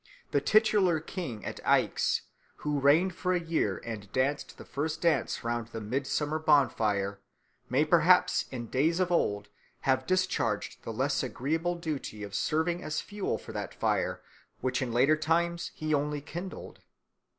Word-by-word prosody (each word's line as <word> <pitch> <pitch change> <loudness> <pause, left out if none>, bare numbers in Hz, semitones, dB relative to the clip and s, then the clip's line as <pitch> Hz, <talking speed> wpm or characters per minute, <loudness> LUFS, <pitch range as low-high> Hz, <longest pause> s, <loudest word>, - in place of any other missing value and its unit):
The - - +2
titular 210 -6 +4
king 155 - -6
at - - -5
Aix, - - +2 0.4
who 150 -1 +1
reigned 160 +7 +4
for 185 +1 -1
a 180 - +2
year 165 - 0
and 105 -3 -6
danced 140 +3 -1
the - - -10
first 155 +4 -3
dance 170 -5 +1
round 120 -1 -2
the 115 -1 -6
midsummer 140 +7 -1
bonfire, 105 -10 +2 0.5
may - - +3
perhaps - - +4
in 120 -2 -4
days 155 +9 +1
of 180 -1 +1
old 100 -11 +1 0.3
have 130 -1 +1
discharged 185 - 0
the - - -5
less 130 +4 0
agreeable 160 +7 -1
duty 150 -10 -5
of 100 -1 -7
serving 160 - 0
as 155 - -2
fuel 205 -1 -3
for - - -10
that - - -5
fire - - 0 0.4
which 130 0 -1
in 125 -3 -2
later 130 +6 +4
times 170 +2 0
he 155 -1 -2
only 150 0 0
kindled. 175 +6 -7
145 Hz, 155 wpm, -29 LUFS, 120-170 Hz, 0.5 s, titular